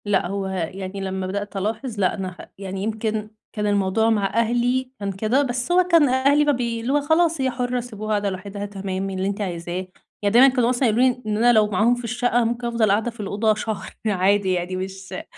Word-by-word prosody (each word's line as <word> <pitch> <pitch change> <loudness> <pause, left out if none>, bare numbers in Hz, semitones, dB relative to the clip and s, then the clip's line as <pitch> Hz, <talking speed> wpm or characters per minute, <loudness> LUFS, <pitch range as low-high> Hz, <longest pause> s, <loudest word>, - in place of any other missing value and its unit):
لأ، 200 -3 +1
هُو 195 +1 -3
يعني 190 +1 -4
لمّا 190 -1 -3
بدأت 200 +1 -4
ألاحظ 220 +3 -3
لأ 185 -2 +2
أنا 190 -2 -4
خ 180 - -16 0.2
يعني 195 0 -5
يمكن 215 0 -2 0.2
كان 210 -1 -1
الموضوع 205 +2 +2
مع 210 -3 +2
أهلي، 245 +3 +1
كان 200 -1 -2
كده، 215 +8 +1
بس 245 +3 -2
هُو 365 +1 +5
كان 335 -6 +4
أهلي 280 +3 +3
مبي 240 -5 0
اللي 250 +4 -1
هُو 290 - +3
خلاص، 320 +1 +2
هي 260 -1 +1
حرة، 250 0 -1
سيبوها 215 -3 -7
قاعدة 205 -1 +1
لوحِدها، 200 +2 -6
تمام، 195 -1 -4
اللي 190 0 -2
أنتِ 200 +1 -3
عايزاه. 175 -1 -4 0.3
يعني 205 0 +1
دايمًا 250 +3 +8
كانوا 250 -3 +2
مثلًا 250 +1 +2
يقولوا 225 +4 +2
لي 250 0 -1
إن 210 -1 -1
أنا 240 +2 +5
لو 215 -2 +4
معاهم 215 +4 +2
في 245 - -8
الشقة 245 +1 -1
أنا 240 - +3
ممكن 240 +1 -2
أفضل 230 -3 +2
قاعدة 220 +4 +1
في 230 - -21
الأوضة 210 +2 +1
شهر 210 -2 -5
عادي 200 -1 +2
يعني 180 +1 -2
مش 190 +1 -6
اللي 185 - -5
215 Hz, 220 wpm, -22 LUFS, 195-245 Hz, 0.3 s, دايمًا